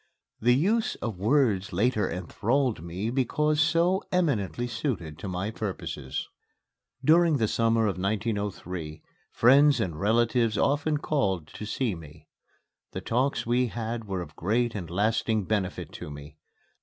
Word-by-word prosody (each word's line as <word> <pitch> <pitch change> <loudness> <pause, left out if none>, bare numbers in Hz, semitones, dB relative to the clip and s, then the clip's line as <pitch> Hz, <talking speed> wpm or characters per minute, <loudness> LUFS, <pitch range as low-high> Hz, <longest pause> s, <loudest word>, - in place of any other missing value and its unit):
The 120 +2 +4
use 210 - +1
of 110 -6 -5
words 110 -4 +2
later 105 +1 +1
enthralled 110 - -1
me 90 +7 -4
because 150 +4 +1
so 170 +4 +3
eminently 125 - 0
suited 110 - -3
to 95 - -6
my 95 +3 -3
purposes. 95 -11 -4 0.8
During 165 0 +5
the 110 -4 +1
summer 115 +1 +2
of 95 -3 -1
1903, 100 -6 -3 0.3
friends 140 +4 +5
and 80 -4 -2
relatives 115 +2 +2
often 145 +4 +1
called 100 - 0
to 105 - -8
see 115 -1 -1
me. 80 -2 -12 0.7
The - - -4
talks 130 +5 0
we 125 +2 +2
had 115 0 -4
were 95 -3 -3
of 80 -2 -14
great 115 +6 0
and 90 -6 -5
lasting 110 +3 +1
benefit 95 -2 -2
to - - -8
me. 75 0 -10
110 Hz, 140 wpm, -27 LUFS, 95-130 Hz, 0.8 s, During